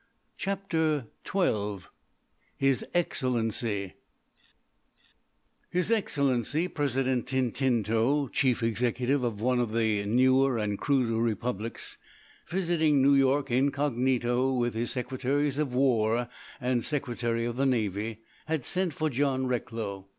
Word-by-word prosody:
CHAPTER 160 -8 -1 0.3
XII 105 - 0 0.8
HIS 135 -2 +2
EXCELLENCY 115 - -1 1.8
His 180 +4 0
Excellency 145 - +1
President 130 -5 -1
Tintinto, 130 +1 +1
Chief 125 -4 +1
Executive 125 +4 0
of 110 -4 -2
one 125 +1 +2
of 115 -3 -1
the 110 -3 +1
newer 130 +3 +3
and 105 -2 -2
cruder 125 -5 +1
republics, 115 -1 -3 0.5
visiting 165 -5 +2
New 140 +1 +6
York 135 0 +3
incognito 130 -1 +1
with 120 -2 0
his 115 +1 -2
Secretaries 135 +3 -1
of 140 -5 -1
War 120 -3 +2 0.3
and 125 -2 +1
of - - -3 0.7
the 135 - +2
Navy, 110 -2 -1 0.3
had 155 -5 -1
sent 180 -5 -1
for 155 -1 -1
John 130 0 0
Recklow. 110 -6 -3
130 Hz, 105 wpm, -28 LUFS, 115-140 Hz, 1.8 s, New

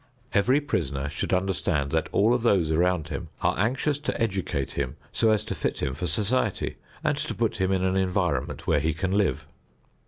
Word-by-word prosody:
Every 120 +6 +4
prisoner 70 - -2
should - - -3
understand 90 -7 0
that 80 -1 0
all 110 +4 +4
of 125 - +1
those 95 -9 +3
around 85 -1 +1
him - - -5
are - - +3
anxious 130 +7 +1
to 150 - -3
educate 95 - -1
him 65 -3 -3 0.2
so 115 - +3
as 110 0 +2
to 105 - -3
fit 85 - -2
him 65 - 0
for 90 +6 -3
society 105 +5 0 0.3
and - - +2
to - - -2
put - - 0
him 95 0 +1
in 95 -1 +1
an 95 0 +1
environment 90 -7 0
where 75 - +3
he 80 +3 0
can 95 +3 -1
live. 100 -1 +1
95 Hz, 195 wpm, -26 LUFS, 80-110 Hz, 0.3 s, Every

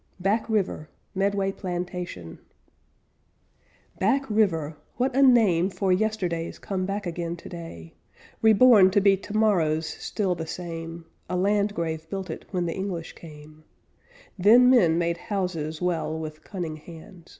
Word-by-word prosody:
BACK 205 +5 0
RIVER 195 -7 -1 0.2
"MEDWAY 195 0 0
PLANTATION" 175 - -6 1.6
Back 270 +8 +1
River! 165 -8 +1 0.2
What 255 +1 0
a 275 - +4
name 215 -9 +5
For 190 -1 0
yesterdays 180 -5 -1
come 190 -2 -3
back 200 +1 -3
again 170 0 -3
today, 165 - -10 0.5
Reborn 220 -3 +7
to 200 - +5
be 200 0 +5
tomorrows 190 -7 +1
still 190 +3 -2
the 160 -2 -6
same 165 -1 -6 0.2
A 180 - -1
landgrave 180 -5 -1
built 190 -2 -4
it - - -8
when 180 -3 -1
the 165 - -2
English 190 -4 -5
came; 155 -1 -14 0.8
Then 240 +7 +7
men 175 -10 +4
made 170 0 0
houses 175 -5 -3
well 165 -3 -1
With 155 -1 -7
cunning 170 -6 -5
hands. 170 +2 -13
180 Hz, 130 wpm, -25 LUFS, 165-205 Hz, 1.6 s, Reborn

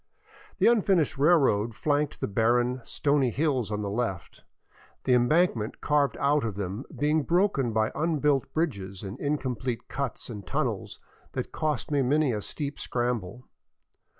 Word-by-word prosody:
The - - +2
unfinished 195 - +3
railroad 135 -9 +3
flanked 145 +2 0
the - - 0
barren, 120 +4 +1
stony 140 -1 +1
hills 130 -4 0
on 105 0 -2
the 100 - -2
left, 105 -5 -3 0.6
the 130 - +2
embankment 125 -2 +2
carved 145 -1 +1
out 145 +1 +2
of 110 -4 -3
them 100 +5 -4
being 150 +2 +2
broken 170 - +1
by 110 0 +1
unbuilt 150 -4 +1
bridges 100 - -2
and 100 +5 -7
incomplete 130 -5 -2
cuts 140 -4 -4
and 105 -4 -7
tunnels - - -3 0.3
that - - -4
cost 150 -5 -2
me 145 -1 +2
many 140 0 +2
a 105 - -2
steep 145 +6 -4
scramble. 120 -2 -3
130 Hz, 145 wpm, -27 LUFS, 110-150 Hz, 0.6 s, unfinished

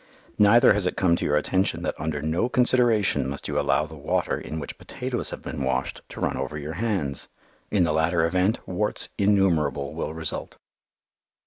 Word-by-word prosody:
Neither 105 +3 +7
has 100 -3 0
it - - -3
come 85 -3 +3
to - - -3
your 75 - +2
attention 95 +5 0
that - - -1
under 75 -1 -3
no 80 +10 0
consideration 120 - +2
must 70 - -5
you - - 0
allow 75 - +2
the 80 - -12
water 70 - -1
in 80 - -5
which 70 - -7
potatoes - - -4
have - - -8
been 70 - -4
washed 65 0 -1
to - - -9
run - - -1
over 75 - -3
your 75 +1 -5
hands. 90 - -2 0.4
In 100 -4 +2
the 80 -2 +1
latter 80 +1 +2
event, 90 +6 0
warts 105 +3 0
innumerable 85 -9 +2
will 80 - -4
result. 80 -1 -5
85 Hz, 185 wpm, -25 LUFS, 75-100 Hz, 0.4 s, Neither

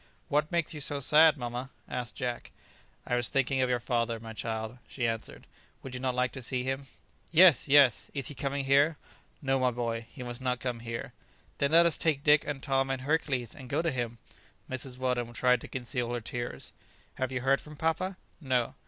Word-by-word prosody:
"What 150 +1 +1
makes 170 -2 0
you 150 - -6
so 145 0 -2
sad, 155 +3 +6
mamma?" 125 +1 -4 0.2
asked 125 -1 -4
Jack. 120 -2 -4 0.6
"I - - -3
was 120 -1 +2
thinking 135 0 +1
of 130 - +2
your 125 -1 +1
father, 115 -1 -1
my 115 0 -8
child," 110 +3 -4
she 120 -3 -2
answered; 115 -1 -5 0.4
"would 135 - -8
you 125 - -3
not 130 -1 -1
like 125 0 +1
to 130 - -7
see 125 +1 -2
him?" 135 +1 -3 0.4
"Yes, 170 -4 +7
yes; 140 -5 +5
is 140 -2 -3
he - - -3
coming 140 -1 -2
here?" 140 +3 +4 0.5
"No, 135 -1 +2
my 130 -1 +3
boy, 115 -1 -3
he 130 - -8
must 120 +1 -5
not 125 -1 -1
come 120 -1 -3
here." 115 0 -6 0.5
"Then 140 - +2
let 170 +1 +7
us 170 -3 +3
take 150 -4 +1
Dick, 150 0 +5
and 145 -3 -4
Tom, 135 -1 +1
and 130 -1 -2
Hercules, 135 -5 0
and 130 -2 -11
go 150 +5 0
to 165 - +1
him." 120 -2 -3 0.5
Mrs. 130 0 -5
Weldon 125 -2 -1
tried 125 +1 +3
to - - -8
conceal 120 -1 -3
her 120 - -1
tears. 120 +1 -5 0.5
"Have 130 0 -1
you 130 -1 -2
heard 135 +2 +2
from 150 -1 -12
papa?" 165 +4 -1 0.2
"No." 130 -6 0
130 Hz, 205 wpm, -30 LUFS, 120-140 Hz, 0.6 s, Yes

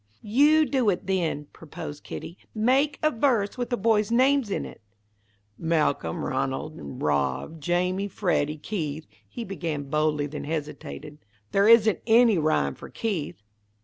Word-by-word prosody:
"You 295 +8 +4
do 260 -7 +1
it, 185 - -1
then," 170 -6 -1
proposed 150 -2 -9
Kitty. 170 - -7 0.2
"Make 265 +7 +2
a 310 - +4
verse 225 -6 +1
with 245 -1 -3
the 245 - 0
boys' 215 -1 +2
names 260 0 +3
in 195 - -2
it." - - -11 0.8
"Malcolm, 150 - 0
Ranald, - - -2
and 70 -1 -8
Rob, 70 - -1
Jamie, 180 +5 0
Freddy, 155 -7 0
Keith," 155 -3 -4 0.2
he 240 - -6
began, 160 -8 -4
boldly, 150 -1 +1
then 150 +1 -6
hesitated. 150 -1 -6 0.3
"There 200 +1 +3
isn't 225 -2 +6
any 225 -4 +5
rhyme 150 - +1
for - - -11
Keith." 180 - -4
180 Hz, 145 wpm, -26 LUFS, 150-225 Hz, 0.8 s, isn't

